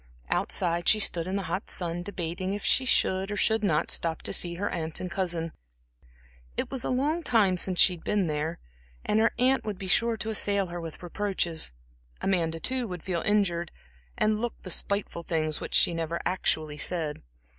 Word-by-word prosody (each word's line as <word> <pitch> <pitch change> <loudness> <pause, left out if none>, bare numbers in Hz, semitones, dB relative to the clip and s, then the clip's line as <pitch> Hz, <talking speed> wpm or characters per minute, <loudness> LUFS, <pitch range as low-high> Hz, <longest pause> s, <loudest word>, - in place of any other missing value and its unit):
Outside 175 0 +2
she 215 - +5
stood 175 -4 +2
in 190 - -2
the 200 - -1
hot 195 - -3
sun 175 -1 -2
debating 185 0 -3
if 205 - -4
she 265 - +3
should 190 -5 +2
or 205 - -3
should 220 0 +2
not 160 -6 +2
stop 165 -1 0
to - - -2
see 170 -1 +2
her 200 +4 -2
aunt 160 -1 -3
and 180 - -5
cousin. 170 -3 -1 1.1
It - - -1
was 265 -3 -1
a - - -1
long 290 +7 +1
time 220 - +3
since 180 0 0
she 185 - +7
had 165 - -18
been 205 -3 +1
there, 155 +1 -2 0.5
and 210 - +2
her 225 +1 +5
aunt 260 +2 +3
would 210 -3 -4
be 190 - -6
sure 230 +5 +2
to 220 - -3
assail 200 -2 +2
her 175 -1 -6
with 165 +1 -8
reproaches. 175 - -1 0.5
Amanda, 165 -4 0
too, 255 +4 -2
would 180 -4 -6
feel 175 -3 -1
injured, 175 -5 +1 0.5
and 215 0 +2
look 240 -1 -3
the 185 - -5
spiteful 200 -2 -1
things 155 -2 -1
which - - -3
she - - +5
never 165 0 -2
actually 155 -4 0
said. 155 -1 -1
185 Hz, 195 wpm, -28 LUFS, 170-210 Hz, 1.1 s, she